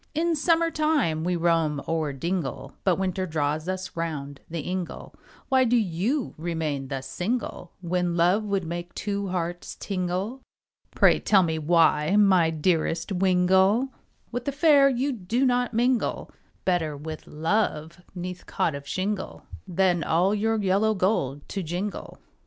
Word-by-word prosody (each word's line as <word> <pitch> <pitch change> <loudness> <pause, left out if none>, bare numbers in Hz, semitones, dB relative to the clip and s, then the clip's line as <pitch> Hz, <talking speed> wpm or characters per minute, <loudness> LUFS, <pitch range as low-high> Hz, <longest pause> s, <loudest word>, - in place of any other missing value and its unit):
In 330 +1 +1
summer 330 +2 +2
time 295 - +1
we 180 +1 0
roam 165 -3 +1
o'er 160 -3 0
dingle, 165 0 -3
But 185 -3 +3
winter 185 0 -2
draws 155 +1 -1
us 185 0 -4
round 145 -4 -4
the 165 -1 -3
ingle, 180 +2 -5 0.3
Why 260 -1 +4
do 245 0 +3
you 220 - -1
remain 155 -5 -2
thus 135 0 -5
single, 180 - -3
When 175 0 -1
love 180 +5 +3
would 200 -2 -1
make 175 +1 -6
two 200 -1 -2
hearts 175 -1 -3
tingle, 190 +6 -3 0.5
Pray, - - +5
tell 195 -3 +4
me 160 -2 -1
why 160 +1 +3
my 190 -5 +5
dearest 165 +2 0
wingle, 190 +6 +3 0.4
With 245 0 -4
the 280 - 0
fair 280 -1 +5
you 265 +2 0
do 235 +3 -1
not 245 -1 +1
mingle, 240 +1 0 0.3
Better 165 -5 0
with 155 +2 -8
love 165 0 -1
'neath 180 0 -6
cot 160 - 0
of 140 0 -7
shingle, 190 +3 -3 0.2
Than 180 -2 +2
all 180 +7 +2
your 220 +2 +1
yellow 205 +2 +2
gold 145 -8 0
to 195 - -3
jingle. 180 +5 -4
180 Hz, 145 wpm, -26 LUFS, 165-210 Hz, 0.5 s, Pray